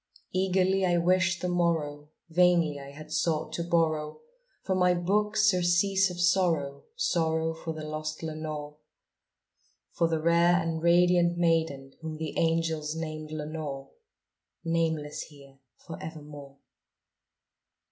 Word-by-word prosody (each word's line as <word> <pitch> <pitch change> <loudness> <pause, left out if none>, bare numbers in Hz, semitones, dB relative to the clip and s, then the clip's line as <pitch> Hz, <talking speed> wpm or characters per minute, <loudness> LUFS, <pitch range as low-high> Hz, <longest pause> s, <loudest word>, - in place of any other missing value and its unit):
Eagerly 190 +1 +1
I 175 -2 +3
wished 175 0 +2
the - - +1
morrow; 160 -4 -1 0.2
vainly 170 -3 +3
I 140 0 -9
had 150 +2 -11
sought 160 -2 -1
to 170 - -2
borrow 155 -3 0 0.4
From 190 -1 0
my 180 0 +4
books 210 +5 +1
surcease 185 +2 +2
of 180 -1 -7
sorrow 170 -6 +1
sorrow 160 - 0
for 160 0 -6
the 155 -1 -7
lost 155 +1 -5
Lenore 155 -2 -5 1.1
For 170 - +1
the 165 -1 0
rare 170 +2 +4
and 165 -2 -1
radiant 175 0 +4
maiden 160 -5 0
whom 160 -1 -5
the 160 -1 -5
angels 165 -2 0
named 155 -1 -5
Lenore 150 -3 -5 0.7
Nameless 160 -3 -1
here 140 -2 -17 0.2
for 165 - -10
evermore. 145 -3 -9
165 Hz, 125 wpm, -28 LUFS, 155-175 Hz, 1.1 s, my